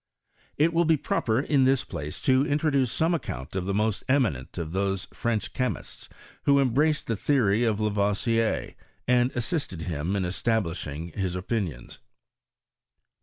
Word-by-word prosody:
It 160 +3 +3
will 170 +1 +3
be 160 -1 +4
proper 115 -4 0
in 140 -1 +2
this 130 0 +3
place 75 -3 -6
to 130 0 +4
introduce 145 -4 +1
some 165 +2 +1
account 85 - -4
of 95 -1 -2
the 100 - 0
most 110 0 0
eminent 115 - +1
of 80 -2 -4
those 95 +1 -1
French 110 -3 -2
che 125 -1 +1
mists - - -8 0.4
who 140 0 +5
embraced 145 +4 +2
the 115 - -1
theory 115 -2 +2
of 110 -2 +1
Lavoisier, 105 +2 0 0.3
and 125 0 +3
assisted 120 - -2
bim 85 +3 -2
in 95 -2 0
establishing 85 -6 -2
his 90 +1 -3
opinions. 90 - -4
110 Hz, 150 wpm, -26 LUFS, 95-135 Hz, 0.4 s, who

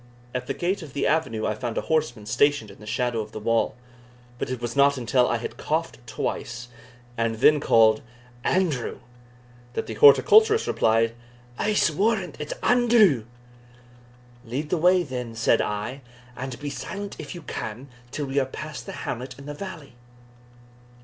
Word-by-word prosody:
At 125 0 -3
the - - -2
gate 190 +3 -1
of 150 -5 -10
the 140 - -1
avenue 130 -9 0
I - - 0
found 120 +1 -4
a - - +1
horseman 155 -9 -1
stationed 130 -1 +2
in 100 - -16
the 105 - -12
shadow 120 0 0
of 105 - -9
the - - -5
wall, 115 +2 +1 0.6
but - - -3
it 130 -1 -3
was 120 -1 -4
not 140 0 +4
until 125 +1 +2
I - - +1
had - - -6
coughed - - -2
twice, 120 +1 -4 0.5
and 115 -1 +1
then 150 +7 +5
called 110 -5 +4 0.4
"Andrew," 165 -10 0 0.8
that - - -2
the - - -6
horticulturist 440 0 +6
replied, 115 +1 +2 0.5
"I'se 210 -5 +2
warrant 195 -1 0
it's 150 0 -4
Andrew." 225 - +4 1.2
"Lead 135 +6 -4
the 180 - +2
way, 180 +2 +4
then," 125 -5 -5
said 115 - +3
I, 105 +6 -3 0.3
"and 130 -1 -6
be 145 -1 -4
silent 200 +5 -6
if 155 +2 -7
you 170 - -9
can, 115 0 -6 0.2
till 145 +3 -3
we 135 +1 0
are 135 - +1
past 130 - -8
the - - -6
hamlet 130 +2 -5
in 140 - -11
the 145 - -5
valley." 160 -5 -8
135 Hz, 170 wpm, -25 LUFS, 115-170 Hz, 1.2 s, horticulturist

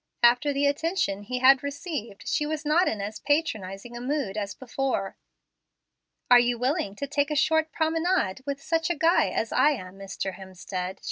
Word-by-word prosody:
After 245 +5 +5
the 280 0 +1
attention 285 - 0
he 250 +5 -4
had 260 +1 +6
received, 280 - -6
she 300 -1 0
was 305 0 -4
not 330 +5 +3
in 210 - -1
as 205 +2 -5
patronizing 240 - -2
a 240 - -6
mood 260 -6 -2
as 205 -1 -3
before. 260 -6 -2 1.2
"Are 245 - +10
you 240 0 +1
willing 250 -5 -1
to 280 - -4
take 285 +1 0
a 300 - -1
short 315 +2 +2
promenade 325 - 0
with 280 0 -4
such 325 -1 0
a 345 - +1
guy 330 +3 +3
as - - -2
I 300 - +4
am, 185 -6 -9
Mr. 195 -1 -4
Hemstead?" 185 0 -6
270 Hz, 180 wpm, -26 LUFS, 200-305 Hz, 1.2 s, Are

